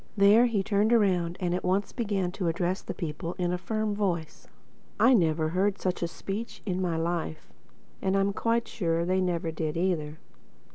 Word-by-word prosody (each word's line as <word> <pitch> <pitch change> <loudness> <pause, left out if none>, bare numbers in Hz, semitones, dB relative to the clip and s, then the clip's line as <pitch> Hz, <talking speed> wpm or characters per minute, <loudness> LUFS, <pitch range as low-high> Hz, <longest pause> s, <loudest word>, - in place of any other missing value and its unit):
There 205 +5 +6
he 210 -5 0
turned 210 +2 +2
around 180 -6 +2
and 175 -1 -1
at 180 - -2
once 190 +2 0
began 200 -6 -1
to 180 -1 -3
address 175 +3 0
the - - -6
people 165 0 -4
in 180 -1 0
a - - 0
firm 215 +2 -1
voice. 180 -6 -2 0.5
I 260 - +6
never 160 -6 +2
heard 190 +4 +1
such 185 -1 -2
a 170 - +1
speech 205 +5 -6
in 185 -2 -1
my 170 -3 0
life—and 170 - -4
I - - +3
am 195 +1 +1
quite 230 +3 0
sure 165 -5 -1
that - - -1
they 185 +1 +2
never 170 -3 -1
did 155 -1 -3
either. 160 -4 -1
185 Hz, 190 wpm, -28 LUFS, 170-200 Hz, 0.5 s, There